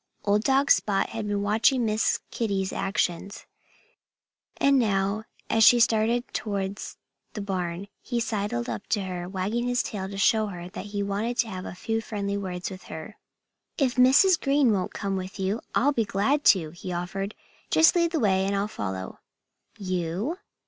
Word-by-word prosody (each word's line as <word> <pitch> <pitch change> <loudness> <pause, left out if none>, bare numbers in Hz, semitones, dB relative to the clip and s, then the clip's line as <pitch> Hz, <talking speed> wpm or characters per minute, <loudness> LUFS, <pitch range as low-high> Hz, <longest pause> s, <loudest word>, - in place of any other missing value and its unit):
Old 205 +1 +3
dog 275 +2 +3
Spot 195 -2 +3
had 225 -2 -4
been 205 -1 -1
watching 225 +4 +3
Miss 215 0 +1
Kitty's 195 -4 -1
actions. 195 -1 -2 1.1
And 275 -1 +4
now, 200 -1 0 0.2
as 225 - +3
she 240 +2 +8
started 230 +1 +3
towards 200 -1 -4 0.4
the - - -5
barn, 185 -1 -3
he 240 -2 -2
sidled 205 - -2
up 115 -3 -5
to 210 - 0
her, 180 -1 -5
wagging 205 +6 -2
his 245 0 +1
tail 190 -3 -5
to 200 - -7
show 215 +2 +3
her 175 -3 -7
that 205 +1 -7
he 205 0 -2
wanted 210 +5 -2
to 230 - +1
have 185 -2 -6
a - - -7
few 225 +4 -2
friendly 200 -3 -3
words 185 -2 -4
with 185 0 -10
her. 160 +7 -8 0.6
"If 260 -4 +2
Mrs. 275 +9 +5
Green 275 -4 +3
won't 185 -2 -1
come 195 -2 -2
with 185 +2 -6
you, 195 +4 -1
I'll 285 +3 +3
be 230 - +1
glad 210 +10 +1
to," 170 -7 +4
he 175 +2 -7
offered. 195 +4 -4 0.3
"Just 320 +2 +5
lead 340 -1 +3
the 330 - 0
way 190 -4 +2
and 200 - 0
I'll 200 +1 0
follow." 95 - -5 0.6
"You?" 185 - -2
205 Hz, 175 wpm, -26 LUFS, 190-230 Hz, 1.1 s, she